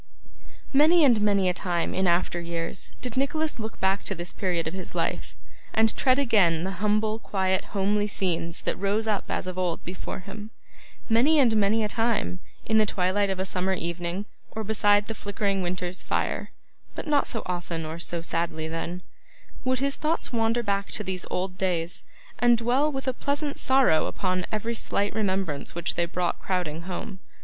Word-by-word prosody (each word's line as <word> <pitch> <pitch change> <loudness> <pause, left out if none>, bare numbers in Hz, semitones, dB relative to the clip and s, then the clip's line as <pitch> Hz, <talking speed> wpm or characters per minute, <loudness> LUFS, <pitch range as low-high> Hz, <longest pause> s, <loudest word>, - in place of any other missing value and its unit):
Many 315 +4 +6
and 235 -6 +5
many 200 -2 +3
a 180 - +3
time 175 -1 -1
in 190 0 +1
after 175 0 +1
years 170 -1 -4
did 250 -3 -3
Nicholas 300 +2 0
look 220 -1 -5
back 190 +1 +1
to 195 - 0
this 175 0 -3
period 180 -4 -1
of 160 - -4
his 185 -2 -6
life, - - -2 0.4
and 220 0 +4
tread 255 -1 +3
again 200 - +3
the 190 - -2
humble 215 +1 +1
quiet 190 -3 0
homely 205 +1 0
scenes 170 -4 -2
that - - -1
rose 200 +3 0
up 210 -3 0
as - - -1
of 185 0 -4
old 175 -2 -1
before 180 +2 -5
him. 205 +3 -8 0.6
Many 255 +8 +4
and 245 -6 +5
many 215 +1 +3
a - - +1
time, 215 - 0 0.3
in 220 -1 +3
the 215 - +3
twilight 195 +2 +1
of 190 -1 -2
a 190 - 0
summer 185 0 0
evening, 170 +3 -3 0.2
or 220 - -5
beside 205 -1 +3
the 225 - -4
flickering 200 -2 -1
winter's 180 0 -3
fire - - -1 0.5
but - - -5
not 295 -2 +2
so 225 - -1
often 170 -2 -3
or 160 +2 -5
so 170 0 -1
sadly 165 -1 -2
then 170 +2 -4 0.6
would 255 0 +1
his 275 +2 0
thoughts 310 -3 -1
wander 230 +1 +1
back 200 -2 0
to 210 - -2
these 185 -2 -3
old 185 0 -3
days, 175 -3 -1 0.3
and 240 -1 +5
dwell 250 +6 +2
with 270 -1 -5
a 260 - +2
pleasant 285 +2 -1
sorrow 260 - +4
upon 185 -1 -1
every 225 +2 -1
slight 205 -2 0
remembrance 190 -10 -1
which 170 -1 -2
they 170 - +1
brought 175 0 -1
crowding 175 -4 -2
home. 185 +1 -5
195 Hz, 185 wpm, -26 LUFS, 180-225 Hz, 0.6 s, Many